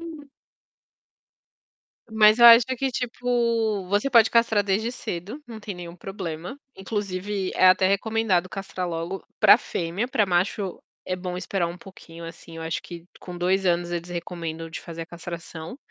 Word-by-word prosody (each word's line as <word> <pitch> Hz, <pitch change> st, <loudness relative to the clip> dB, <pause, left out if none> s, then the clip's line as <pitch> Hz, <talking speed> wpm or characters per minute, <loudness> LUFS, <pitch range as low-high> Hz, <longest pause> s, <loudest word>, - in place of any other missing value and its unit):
Uhum. 315 Hz, -4 st, -10 dB, 1.8 s
Mas 215 Hz, 0 st, +5 dB
eu 235 Hz, -, +9 dB
acho 235 Hz, 0 st, +10 dB
que, 270 Hz, +1 st, 0 dB
tipo, 235 Hz, -4 st, 0 dB
você 205 Hz, +7 st, +1 dB
pode 230 Hz, -4 st, +5 dB
castrar 230 Hz, -3 st, +3 dB
desde 205 Hz, +4 st, 0 dB
cedo, 195 Hz, -, -6 dB
não 230 Hz, -2 st, -9 dB
tem 205 Hz, -2 st, -7 dB
nenhum 175 Hz, -1 st, -9 dB
problema, 180 Hz, -, -6 dB, 0.2 s
inclusive 195 Hz, -1 st, -3 dB
é 185 Hz, -, +5 dB
até 185 Hz, 0 st, +5 dB
recomendado 200 Hz, -2 st, +1 dB
castrar 185 Hz, -1 st, -5 dB
logo 170 Hz, +3 st, -4 dB, 0.2 s
pra 215 Hz, 0 st, +8 dB
fêmea, 180 Hz, +2 st, -3 dB
pra 255 Hz, -5 st, +2 dB
macho 190 Hz, +1 st, -1 dB, 0.2 s
é 185 Hz, -, -2 dB
bom 180 Hz, -1 st, -5 dB
esperar 180 Hz, -1 st, -1 dB
um 170 Hz, +1 st, -6 dB
pouquinho, 170 Hz, -3 st, -12 dB
assim, 165 Hz, 0 st, -10 dB
eu -, -, -6 dB
acho 160 Hz, 0 st, -3 dB
que 170 Hz, -1 st, -10 dB, 0.2 s
com 180 Hz, -1 st, -8 dB
2 185 Hz, +2 st, +1 dB
anos 175 Hz, 0 st, +1 dB
eles 175 Hz, 0 st, -4 dB
recomendam 165 Hz, -2 st, -5 dB
de 160 Hz, -, -6 dB
fazer 165 Hz, -1 st, -7 dB
a -, -, -9 dB
castração, 170 Hz, +1 st, -8 dB
190 Hz, 160 wpm, -25 LUFS, 175-220 Hz, 1.8 s, acho